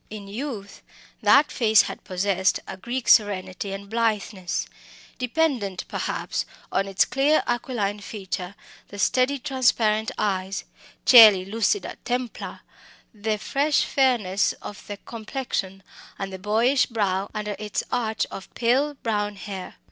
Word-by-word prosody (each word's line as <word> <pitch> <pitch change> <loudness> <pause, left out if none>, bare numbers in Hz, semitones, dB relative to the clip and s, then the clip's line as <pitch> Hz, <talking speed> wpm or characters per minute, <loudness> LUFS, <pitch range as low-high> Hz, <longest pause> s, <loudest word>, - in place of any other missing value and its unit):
In 210 -2 -8
youth 210 -2 -6 0.4
that 290 +2 +5
face 220 -4 +5
had - - -7
possessed 190 0 +1
a - - -6
Greek 240 +6 -4
serenity 195 -2 +2
and 195 +1 -6
blitheness, 215 -4 -1 0.5
dependent 250 - -1
perhaps - - -2 0.3
on 195 0 0
its 195 0 +3
clear 285 +3 +2
aquiline 230 -4 -1
feature, 195 -2 -6 0.3
the 205 - -10
steady 255 +6 +2
transparent 240 -5 +1
eyes 195 -1 -1 0.4
coeli 215 -7 +9
lucida 225 - -1
templa 245 -1 -4 0.5
the 215 0 -2
fresh 285 +7 +1
fairness 235 -8 +2
of 205 - -10
the 205 - -6
complexion, 215 -4 -5 0.3
and 195 -1 -5
the 190 - -6
boyish 225 +7 +2
brow 200 -4 -1
under 210 -1 -3
its 210 -1 -2
arch 225 -3 0
of 190 - -9
pale 265 +5 +2
brown 210 -4 -2
hair. 195 -2 -7
210 Hz, 125 wpm, -24 LUFS, 195-245 Hz, 0.5 s, coeli